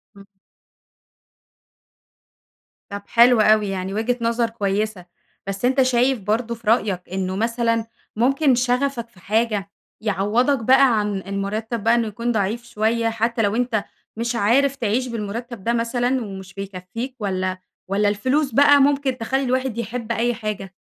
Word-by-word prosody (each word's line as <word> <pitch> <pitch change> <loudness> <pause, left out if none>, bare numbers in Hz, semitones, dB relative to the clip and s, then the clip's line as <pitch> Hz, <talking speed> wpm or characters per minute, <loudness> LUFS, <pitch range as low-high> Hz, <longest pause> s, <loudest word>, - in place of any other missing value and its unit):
امم. 200 - -14 2.7
طب 200 0 -5
حلو 235 -1 +5
أوي 215 -1 +4
يعني 190 0 -3
وجهة 235 +3 0
نظر 230 0 +1
كويسة، 205 -3 -2 0.4
بس 195 +4 -2
أنتَ 265 +1 +3
شايف 255 0 +2
برضه 225 +4 -1
في 225 -1 -17
رأيك 205 -5 +2
إنه 185 0 -2
مثلًا 230 +1 0 0.3
ممكن 270 +3 +3
شغفك 250 -1 0
في 190 - -21
حاجة، 210 0 -1 0.3
يعوّضك 225 +6 +1
بقى 260 -2 +5
عن 205 -2 -1
المرتب 210 +3 -3
بقى 230 +1 +4
إنه 230 -2 +1
يكون 235 +3 -2
ضعيف 220 +2 -1
شوية، 225 0 0
حتى 230 +1 -1
لو 205 +1 +1
أنتَ 235 -4 0 0.3
مش 235 +1 -2
عارف 255 +6 +3
تعيش 245 +1 -1
بالمرتب 230 -1 -5
ده 235 - +1
مثلًا، 245 +2 0
ومش 190 -2 -9
بيكفيك، 195 +6 -6
والّا 185 -2 -2 0.3
والّا 205 +1 +2
الفلوس 260 +8 0
بقى 285 0 +6
ممكن 275 -2 +2
تخلي 265 +4 -1
الواحد 255 -2 -1
يحب 235 0 -4
أي 235 +1 +1
حاجة؟ 210 -4 -5
230 Hz, 145 wpm, -22 LUFS, 205-245 Hz, 2.7 s, بقى